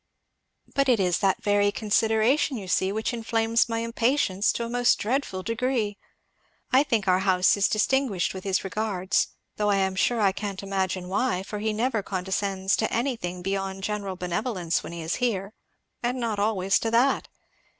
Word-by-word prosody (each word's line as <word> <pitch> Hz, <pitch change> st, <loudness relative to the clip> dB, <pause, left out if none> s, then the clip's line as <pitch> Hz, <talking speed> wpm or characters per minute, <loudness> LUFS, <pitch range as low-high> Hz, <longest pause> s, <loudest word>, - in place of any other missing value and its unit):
"But 275 Hz, -1 st, +2 dB
it 240 Hz, -4 st, +4 dB
is 180 Hz, -3 st, +2 dB
that 195 Hz, -1 st, +1 dB
very 205 Hz, 0 st, +3 dB
consideration, 225 Hz, +6 st, +2 dB
you 195 Hz, -3 st, -7 dB
see, 190 Hz, +1 st, +1 dB
which 220 Hz, +4 st, -2 dB
inflames 230 Hz, 0 st, +1 dB
my 230 Hz, 0 st, -1 dB
impatience 230 Hz, -4 st, +1 dB
to 235 Hz, -, -3 dB
a -, -, -4 dB
most 245 Hz, +1 st, +3 dB
dreadful 220 Hz, -5 st, -2 dB
degree. 230 Hz, -2 st, -1 dB, 0.7 s
I 260 Hz, +1 st, +6 dB
think 230 Hz, -9 st, 0 dB
our 185 Hz, 0 st, +4 dB
house 185 Hz, -1 st, +3 dB
is 200 Hz, 0 st, +3 dB
distinguished 215 Hz, -3 st, +1 dB
with 190 Hz, -1 st, -7 dB
his 195 Hz, -1 st, 0 dB
regards, 195 Hz, -2 st, 0 dB, 0.3 s
though 210 Hz, 0 st, +1 dB
I 200 Hz, -, +3 dB
am 190 Hz, -1 st, 0 dB
sure 235 Hz, +5 st, +1 dB
I 200 Hz, -3 st, +4 dB
can't 200 Hz, 0 st, -5 dB
imagine 190 Hz, -2 st, -2 dB
why, 190 Hz, 0 st, 0 dB
for 210 Hz, +1 st, -6 dB
he 220 Hz, +1 st, 0 dB
never 225 Hz, +1 st, 0 dB
condescends 190 Hz, 0 st, -1 dB
to 220 Hz, -, 0 dB
anything 225 Hz, -8 st, -2 dB
beyond 195 Hz, 0 st, -3 dB
general 200 Hz, -2 st, -3 dB
benevolence 180 Hz, 0 st, -2 dB
when -, -, -8 dB
he 170 Hz, -1 st, -6 dB
is 160 Hz, -, -2 dB
here, 215 Hz, -5 st, -1 dB, 0.5 s
and 245 Hz, +1 st, -1 dB
not 225 Hz, -4 st, -2 dB
always 195 Hz, -2 st, +2 dB
to 225 Hz, -, -1 dB
that. 245 Hz, +4 st, +2 dB
205 Hz, 175 wpm, -26 LUFS, 190-230 Hz, 0.7 s, I